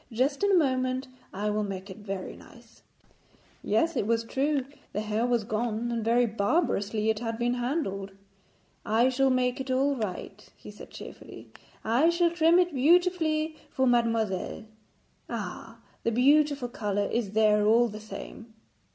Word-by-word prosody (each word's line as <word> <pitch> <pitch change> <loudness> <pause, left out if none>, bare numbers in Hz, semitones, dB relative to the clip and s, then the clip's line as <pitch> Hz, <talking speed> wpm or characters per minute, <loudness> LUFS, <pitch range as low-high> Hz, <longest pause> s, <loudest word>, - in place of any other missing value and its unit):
Just 265 +5 0
in 405 - +3
a - - +5
moment 260 -3 0 0.2
I 210 +2 -2
will 210 0 0
make 195 -1 -6
it 190 - -10
very 195 -2 -6
nice.' - - -17 0.8
Yes, 335 0 +1
it 205 - -1
was 230 0 +1
too 275 +4 0
true, - - -11 0.3
the 210 - -1
hair 215 +2 -1
was 240 -2 +1
gone; 225 +2 -2
and 230 -1 -2
very 235 +2 +3
barbarously 215 - 0
it 215 - -3
had 225 -1 -3
been 240 +1 0
handled. 240 - -2 0.7
'I 230 +4 +3
shall 270 +1 +2
make 255 0 +1
it 265 - -7
all 275 +2 +2
right,' 210 -2 -6
he - - -11
said 210 - -12
cheerfully; - - -11 0.3
'I 245 +9 +3
shall 340 0 +2
trim 335 0 +4
it 355 -2 +2
beautifully 315 +1 +2
for 265 - 0
mademoiselle. 230 -5 0 0.6
Ah, 225 +1 -6 0.2
the 230 - 0
beautiful 280 +2 +3
colour 205 -3 -2
is 225 -4 -2
there 210 -1 +4
all 235 +2 +5
the 215 -1 -8
same.' 225 +1 -9
235 Hz, 160 wpm, -28 LUFS, 215-275 Hz, 0.8 s, a